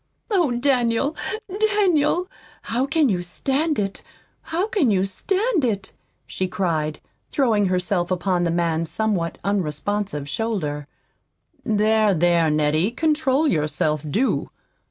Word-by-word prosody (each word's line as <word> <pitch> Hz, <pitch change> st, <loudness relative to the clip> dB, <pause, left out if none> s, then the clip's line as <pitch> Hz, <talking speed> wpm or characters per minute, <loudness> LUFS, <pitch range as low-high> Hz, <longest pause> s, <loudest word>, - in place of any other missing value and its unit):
"Oh, 355 Hz, -8 st, +3 dB
Daniel, 245 Hz, +2 st, +1 dB, 0.6 s
Daniel, 360 Hz, -3 st, +2 dB, 0.4 s
how 250 Hz, +4 st, -1 dB
can 300 Hz, +1 st, +3 dB
you 185 Hz, -6 st, 0 dB
stand 275 Hz, -, -1 dB
it 195 Hz, -1 st, -2 dB, 0.4 s
how 345 Hz, +4 st, -1 dB
can 400 Hz, -, +1 dB
you 190 Hz, -2 st, +2 dB
stand 380 Hz, -, 0 dB
it!" 200 Hz, -5 st, -1 dB, 0.3 s
she 185 Hz, -, -3 dB
cried, 160 Hz, -5 st, -1 dB, 0.3 s
throwing 225 Hz, -7 st, +2 dB
herself 180 Hz, -1 st, 0 dB
upon 180 Hz, -1 st, 0 dB
the 170 Hz, -, +1 dB
man's 165 Hz, -1 st, 0 dB
somewhat 190 Hz, -3 st, -1 dB
unresponsive 195 Hz, -3 st, -2 dB
shoulder. 150 Hz, -7 st, -2 dB, 0.8 s
"There, 215 Hz, -2 st, +3 dB
there, 170 Hz, -1 st, +3 dB
Nettie, 155 Hz, +4 st, +2 dB
control 300 Hz, +1 st, +1 dB
yourself, 150 Hz, -, 0 dB
do!" 225 Hz, -, 0 dB
205 Hz, 115 wpm, -22 LUFS, 170-270 Hz, 0.8 s, Oh